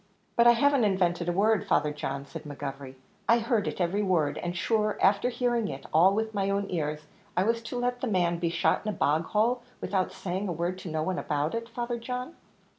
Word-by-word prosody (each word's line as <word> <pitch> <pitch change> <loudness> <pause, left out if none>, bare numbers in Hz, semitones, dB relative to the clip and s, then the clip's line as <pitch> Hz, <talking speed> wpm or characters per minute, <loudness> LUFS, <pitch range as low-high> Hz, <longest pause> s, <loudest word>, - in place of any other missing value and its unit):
"But 235 0 +5
I 240 - +9
haven't 280 +1 +3
invented 180 -4 +1
a - - +2
word, 205 +4 +2
Father 150 -5 +2
John," 140 -1 -4
said 140 - -8
McGovery; 135 -2 -7 0.3
"I 230 - +7
heard 230 -2 0
it - - -4
every 180 +3 +1
word; 170 -7 +1
and 175 0 -3
shure, 215 +1 +1
afther 200 +5 +3
hearing 240 -2 0
it 135 -1 -7
all 180 +5 +6
with 220 0 -1
my 195 -1 0
own 200 0 0
ears, 150 -3 -2 0.3
was 230 +5 +2
I - - -22
to 245 - -4
let 245 0 -1
the 260 - -1
man 175 -5 +1
be 170 -1 0
shot 170 0 +2
into 215 - -4
a - - -21
bog 155 +3 +2
hole, 230 +6 +1 0.2
without 190 -2 -1
saying 190 +2 -3
a - - -2
word 175 +3 -2
to 185 - -7
no 155 0 -1
one 185 +2 -1
about 150 +1 -1
it, 230 0 -4
Father 240 0 -3
John?" 250 +6 -5
195 Hz, 225 wpm, -28 LUFS, 170-230 Hz, 0.3 s, I